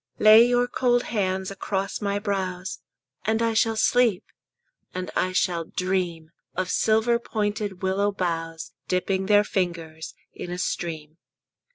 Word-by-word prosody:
Lay 215 +1 +8
your 245 0 +3
cold 245 -1 +1
hands 190 -3 -1
across 195 +1 -3
my 200 -1 0
brows, 190 -3 -3 0.4
And 220 +3 +1
I 230 -1 +1
shall 225 +1 +2
sleep, 225 -2 +3 0.7
and 185 0 -4
I 185 - +1
shall 175 -2 +1
dream 175 -3 -2 0.2
Of 185 -1 -1
silver 220 +2 +2
pointed 205 -4 -3
willow 195 +2 +1
boughs 165 -4 -3
Dipping 190 +1 0
their 205 0 +5
fingers 170 -5 -3 0.2
in - - -7
a 175 - -4
stream. 160 -3 -4
190 Hz, 135 wpm, -25 LUFS, 180-215 Hz, 0.7 s, Lay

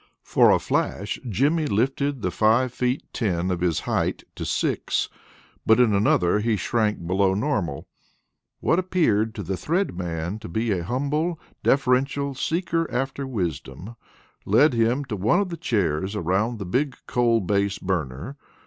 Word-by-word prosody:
For - - +4
a - - +6
flash 100 +1 -2
Jimmy 145 - +1
lifted 135 +3 0
the 90 - 0
five 115 +6 +2
feet 125 +2 -1
ten 95 -5 -1
of 90 -1 -2
his 85 -3 +1
height - - -1
to - - -6
six; - - -1 0.5
but 110 +2 +4
in 120 -4 +4
another 100 -1 +3
he 110 +1 +1
shrank 105 -2 -1
below 95 +2 +2
normal. 100 - -2 0.7
What 165 - +2
appeared 115 - +1
to 105 - -4
the 95 +2 -2
Thread 175 - -1
Man 85 +2 -4
to 110 - -9
be 110 +6 -1
a 90 -3 0
humble, 145 - -1 0.2
deferential 135 +1 +1
seeker 165 +3 -1
after 135 +2 -2
wisdom, 90 - -4 0.5
led 130 +8 +4
him 120 +4 +1
to 115 - -4
one 100 - +2
of 200 -2 -1
the 170 - -4
chairs 95 - -1
around 105 +5 0
the 100 - -5
big 130 +8 -1
coal 120 -2 +2
base 100 0 0
burner. 90 - -3
110 Hz, 155 wpm, -24 LUFS, 95-135 Hz, 0.7 s, a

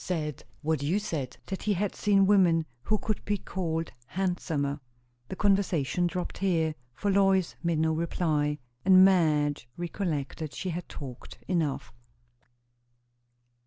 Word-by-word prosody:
"Said 155 -6 -3 0.2
what 155 -2 0
you 155 +7 +1
said; 155 - -3
that 190 - -5
he 210 - +1
had 200 +1 -1
seen 200 -2 +3
women 180 -5 +4 0.2
who 215 +8 0
would 215 - -1
be 205 0 0
called 165 -4 -3 0.2
handsomer." 160 -5 -1 0.5
The - - -5
conversation 180 -5 +2
dropped 180 +1 -4
here, 165 -5 +1 0.2
for 205 - 0
Lois 195 -2 +3
made 170 -2 0
no 160 0 +2
reply, 155 -3 0 0.3
and 185 0 +8
Madge 150 -8 +2
recollected 160 -4 -3
she 185 - -3
had 175 +1 -5
talked 130 -4 -9
enough. 150 -8 -1
170 Hz, 130 wpm, -28 LUFS, 150-190 Hz, 0.5 s, and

